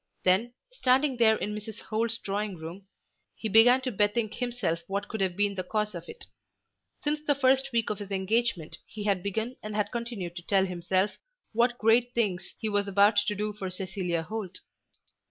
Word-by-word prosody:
Then, 200 +7 +3 0.2
standing 265 - +2
there 220 -2 +5
in 210 -1 -3
Mrs. 210 0 -7
Holt's 230 +1 0
drawing 205 -3 -3
room, 170 +5 -9 0.5
he 220 - -4
began 230 +5 +6
to 260 -1 -2
bethink 210 +1 +1
himself 240 -9 -1
what 200 +1 -2
could 220 -3 -4
have 185 -2 0
been 205 0 +2
the 185 -1 -3
cause 210 +2 -1
of 170 -1 -7
it. 460 - -10 0.8
Since 295 0 0
the 290 - +4
first 265 0 +3
week 230 -3 +1
of 210 - -4
his 205 -1 -7
engagement 195 -3 -1
he 215 - -7
had 200 -3 +1
begun 220 +6 -3
and 215 0 -6
had 210 -1 0
continued 230 -8 -4
to - - -5
tell 190 +2 +2
himself 185 +2 -1 0.3
what 240 +2 +2
great 235 +2 +3
things 190 -6 -1
he 220 - -3
was 205 -1 +1
about 200 +2 +4
to 205 0 +2
do 210 +1 -2
for 195 -2 -5
Cecilia 180 -2 -2
Holt. 190 0 -6
210 Hz, 190 wpm, -28 LUFS, 190-235 Hz, 0.8 s, began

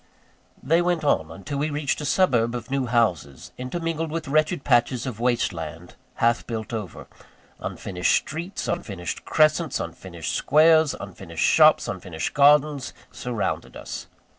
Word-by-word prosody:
They 165 +6 +3
went 175 -2 0
on, 80 - +1
until 95 - -6
we 150 +2 0
reached 145 0 -2
a - - -4
suburb 125 -9 +2
of 120 +2 -7
new 135 -2 0
houses, 90 - 0
intermingled 165 +4 -3
with 160 0 -4
wretched 155 +1 +1
patches 120 -1 +2
of 120 -5 -5
waste 120 -4 +1
land, 80 +1 -8 0.2
half 115 0 +1
built 115 -1 -5
over. 105 -7 -6 0.5
Unfinished 90 -2 -1
streets, 170 +6 -3
unfinished 95 - -4
crescents, 155 0 +2
unfinished - - -5
squares, 155 0 +4
unfinished - - -4
shops, - - +5
unfinished 80 -3 -4
gardens, 145 -1 +3 0.2
surrounded 120 -4 -3
us. - - -7
135 Hz, 140 wpm, -24 LUFS, 110-155 Hz, 0.5 s, shops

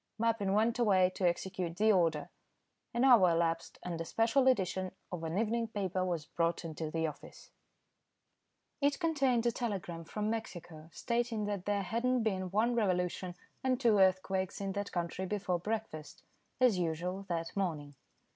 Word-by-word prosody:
Mappin 225 -4 +1
went 225 +3 +2
away 190 -5 +4
to 185 - +1
execute 175 -1 -2
the 215 +2 +4
order. 165 -6 +1 0.6
An 235 +1 0
hour 235 -9 +7
elapsed, 165 0 0
and 170 -2 -4
a - - -3
special 230 +8 +2
edition 190 -6 +1 0.2
of 175 -2 -5
an 165 +3 -2
evening 230 +2 0
paper 190 -4 -2
was 170 -4 -2
brought 170 +1 -1
into 160 -1 -4
the 160 +1 -1
office. 155 -2 -8 1.3
It 280 0 +2
contained 275 -8 +2
a 235 - +3
telegram 190 -8 -4
from 210 +4 -3
Mexico, 175 -8 -6
stating 235 +2 -1
that 205 -3 -3
there 205 -1 0
had 230 +6 -2
not 250 -2 +2
been 190 -4 -1
one 220 +6 +2
revolution, 180 -4 0 0.3
and 255 -1 +1
two 230 -6 +4
earthquakes 190 0 +2
in 195 -1 -2
that 200 +1 -4
country 175 +2 -3
before 190 -3 -1
breakfast, 180 -7 -5 0.4
as 245 -7 +4
usual, 180 +4 -2
that 165 -1 -3
morning. 155 -7 -2
190 Hz, 160 wpm, -33 LUFS, 175-225 Hz, 1.3 s, hour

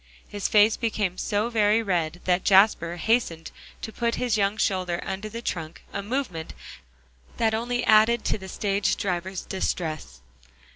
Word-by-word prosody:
His 205 -1 -3
face 215 +1 +4
became 210 -6 -2
so 215 +2 -1
very 215 0 +3
red 175 -4 -1
that 180 0 +2
Jasper 190 -4 +4
hastened 175 -3 0 0.3
to 220 - -6
put 235 -1 -1
his 245 -3 0
young 200 0 +1
shoulder 185 -4 0
under 195 +3 -4
the 230 +2 -7
trunk, 165 -5 -5
a 200 - -2
movement 200 -8 -4 0.8
that 220 -1 +1
only 240 +2 -1
added 220 +2 +4
to - - 0
the 190 0 -9
stage 200 +1 0
driver's 185 0 -3
distress. 155 - -4
200 Hz, 150 wpm, -25 LUFS, 180-220 Hz, 0.8 s, face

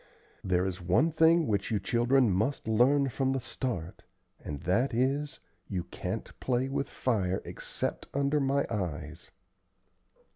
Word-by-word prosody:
There 90 -1 +1
is 95 -1 -3
one 95 - +3
thing 165 +1 +4
which 100 -5 0
you 105 - +1
children 120 +4 +3
must 110 +8 0
learn 135 +5 +4
from 135 +2 0
the 135 - 0
start, 100 -9 -4 0.4
and 70 -2 -5
that 115 +8 +1
is, 140 +5 0 0.3
you 90 -4 -2
can't - - -5
play 130 0 0
with 140 0 -2
fire 95 -7 0
except - - -4
under 140 +1 +1
my 140 0 +1
eyes." 80 -5 -4
120 Hz, 140 wpm, -30 LUFS, 95-140 Hz, 0.4 s, thing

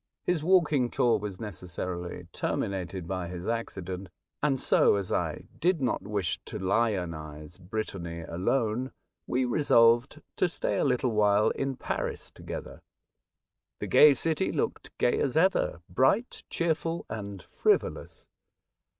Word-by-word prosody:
His 175 -4 0
walking 155 -8 +3
tour 120 -2 +2
was 100 -2 -6
necessarily 90 -3 -5
terminated 95 -2 -3
by 95 -1 -3
his 90 +1 -6
accident, 95 -5 -4 0.3
and 140 -3 +2
so, - - +4
as 100 -2 -2
I - - -1 0.2
did 175 +1 +2
not 130 -3 0
wish 100 -5 -2
to - - -6
lionise 90 -7 -2
Brittany 90 -3 -5
alone, 110 +9 -1 0.3
we 130 +1 +1
resolved 120 0 +4 0.2
to 180 - +2
stay - - -2
a - - +2
little 125 -2 +1
while 105 -1 +3
in 135 -1 -2
Paris - - -4
tpgether. - - -8 1.0
The - - -4
gay 150 -2 +7
city 160 +3 0
looked - - -2
gay 120 - +2
as 135 +1 0
ever 160 - +2
— - - -57
bright, 135 - +1
cheer 170 -1 +1
ful, 165 +2 -4
and 100 -3 -6
frivolous. 425 -1 -1
110 Hz, 135 wpm, -28 LUFS, 90-135 Hz, 1.0 s, gay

